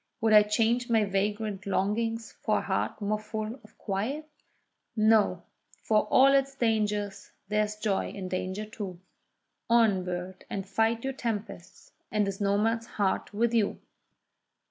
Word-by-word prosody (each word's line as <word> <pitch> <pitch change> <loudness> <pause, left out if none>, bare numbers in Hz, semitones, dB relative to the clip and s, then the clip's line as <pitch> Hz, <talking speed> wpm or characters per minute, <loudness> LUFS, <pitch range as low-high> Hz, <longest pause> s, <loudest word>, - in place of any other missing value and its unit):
Would 220 -1 +3
I 210 - +10
change 230 +3 +1
my 225 -2 +3
vagrant 200 0 -2
longings 225 +4 -1
for - - +2
a - - -1
heart - - -2
more 210 +1 0
full 215 +3 -5
of 215 - -19
quiet? 230 +10 -3 0.7
No!—for 215 0 +1
all 270 +5 +6
its 275 0 +2
dangers, 210 -4 -1 0.2
there 210 0 +2
is 210 0 -6
joy 210 -2 -1
in 190 -2 -6
danger 185 +3 -3
too: 205 -5 -7 0.7
On, 225 -5 +4
bird, 180 +1 -5
and 195 -1 -4
fight 225 +3 +1
your 270 0 -2
tempests, 220 -8 -5 0.2
and 210 -1 +2
this 195 +1 -4
nomad 210 +3 +1
heart 200 -4 -1
with 230 +3 +1
you! 220 -3 +1
215 Hz, 145 wpm, -28 LUFS, 200-225 Hz, 0.7 s, I